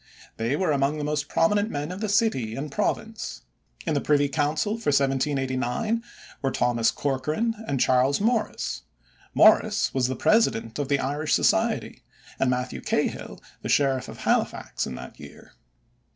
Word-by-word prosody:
They 115 +5 0
were 185 -1 +1
among 140 +1 +1
the 150 - -3
most 150 -1 -2
prominent 205 +5 +2
men 145 0 -4
of 185 +3 -7
the 215 - -1
city 135 - +1
and 145 +2 -5
province. 215 +4 -3 0.4
In 160 - 0
the 145 - +1
Privy 145 -1 +2
Council 150 +6 0
for 225 0 -4
1789 135 - 0 0.4
were 135 - +1
Thomas 120 -3 +1
Corcoran 150 - -1
and 135 - -1
Charles 130 +3 +3
Morris. 225 +1 -1 0.5
Morris 210 -1 +5
was 130 -1 +1
president 125 - +2
of 145 - -1
the 140 0 +2
Irish 145 +3 0
Society - - +1 0.4
and 135 - +2
Matthew 125 0 -2
Cahill - - -2 0.2
the - - -5
sheriff 135 -2 +2
of - - -10
Halifax - - 0
in 65 - -6
that - - -10
year. - - -13
145 Hz, 150 wpm, -25 LUFS, 130-195 Hz, 0.5 s, Morris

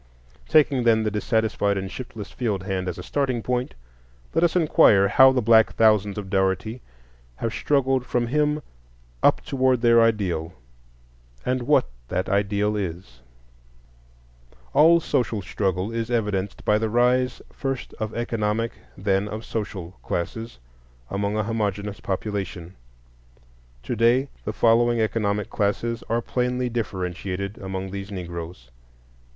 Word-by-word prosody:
Taking, 150 -4 +4
then, 110 -2 +4
the 110 - -1
dissatisfied 105 -2 0
and 95 0 -4
shiftless 115 -5 -8
field 105 -7 -2
hand 95 -2 -2
as 90 +1 -3
a 90 - -7
starting 130 -3 -1
point, 125 - -2 0.6
let 165 - +2
us 170 0 +2
inquire 110 - +5
how 130 0 +7
the 125 -2 0
black 110 0 +5
thousands 105 -3 +3
of 100 -2 -5
Dougherty 95 +5 0 0.5
have 115 - -3
struggled 135 -3 +1
from 120 -1 0
him 150 +3 0 0.6
up - - +4
toward 130 -2 +1
their 115 -1 +6
ideal, 95 -7 0 0.9
and 130 0 0
what 150 - +4 0.2
that 95 - -2
ideal 100 +1 +1
is. 85 -11 -5 1.5
All 165 +4 +6
social 120 -8 -1
struggle 95 +2 -1
is 115 0 -3
evidenced 105 -5 -2
by 105 0 +3
the 110 0 -1
rise, 125 +2 +2
first 135 -2 -4
of 110 -1 -3
economic, 115 -1 -1 0.3
then 95 +1 0
of 110 +2 -6
social 100 -6 -4
classes, 110 - -4 0.5
among 100 +2 -1
a 110 - +1
homogeneous 105 -2 -2
population. 95 -3 -4 1.1
To - - -3
day 120 +4 +3 0.2
the - - -1
following 120 +1 +3
economic 105 -2 0
classes 115 +3 -1
are 115 0 0
plainly 125 0 -1
differentiated 100 -3 -4
among 95 0 -5
these 100 +1 -6
Negroes. 85 -8 -7
110 Hz, 135 wpm, -24 LUFS, 100-120 Hz, 1.5 s, how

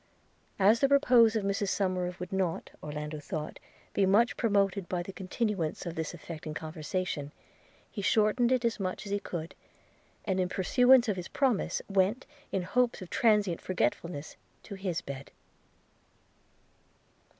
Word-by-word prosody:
As 205 +4 +5
the 275 - +4
repose 245 -5 +5
of 220 - 0
Mrs 200 0 0
Somerive 185 -2 -1
would 180 +1 -6
not, 185 -3 -1
Orlando 150 0 -5
thought, 150 +1 -5 0.3
be 195 -1 +3
much 220 +5 +4
promoted 200 -4 +1
by 175 -1 -1
the 195 - -8
continuance 190 -3 -2
of 170 - -4
this 160 -1 -3
affecting 155 -2 -7
conversation, 155 -1 -4 0.6
he 205 - -5
shortened 220 +4 +3
it 255 -2 +2
as 230 -1 0
much 185 +1 -3
as 200 - -6
he 205 - +1
could, 165 -4 -6 0.7
and, 190 -2 0
in 180 -1 +1
pursuance 245 +7 +4
of 205 -3 0
his 180 - -5
promise, 260 -7 0
went, 200 +5 +1 0.3
in 190 - -1
hopes 245 +2 +1
of 180 - -12
transient 210 -7 +2
forgetfulness, 170 -2 -2 0.3
to 205 - -9
his 190 -3 -3
bed. 140 0 -8
190 Hz, 150 wpm, -30 LUFS, 170-215 Hz, 0.7 s, As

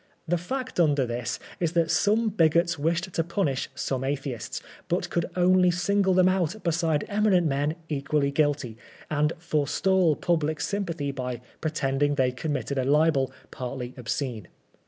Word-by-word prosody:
The 175 +1 +1
fact 255 +5 -4
under 145 -5 +3
this 120 0 -3 0.2
is 170 -2 0
that 165 -2 +2
some 220 +2 +3
bigots 170 -3 +2
wished 170 +4 -1
to 165 - +1
punish 165 -6 -1
some 130 -1 -2
Atheists, 135 -3 -3 0.3
but - - -1
could 170 -1 0
only 180 0 +4
single 190 +1 +2
them 185 0 +5
out 185 +2 0
beside 165 -3 +1
eminent 200 -4 +3
men 145 +1 0
equally 140 -1 0
guilty, 140 -6 0 0.3
and 150 0 +2
forestall 165 +2 +2
pubHc 155 -2 0
sympathy 170 -8 -2
by 125 -3 -4 0.2
pretending 145 -2 0
they 130 -2 +2
had 125 - -18
committed 140 -3 -2
a 130 - 0
Ubel 145 -1 +3 0.2
partly 125 0 -5
obscene. 120 -4 -3
155 Hz, 150 wpm, -26 LUFS, 140-175 Hz, 0.3 s, them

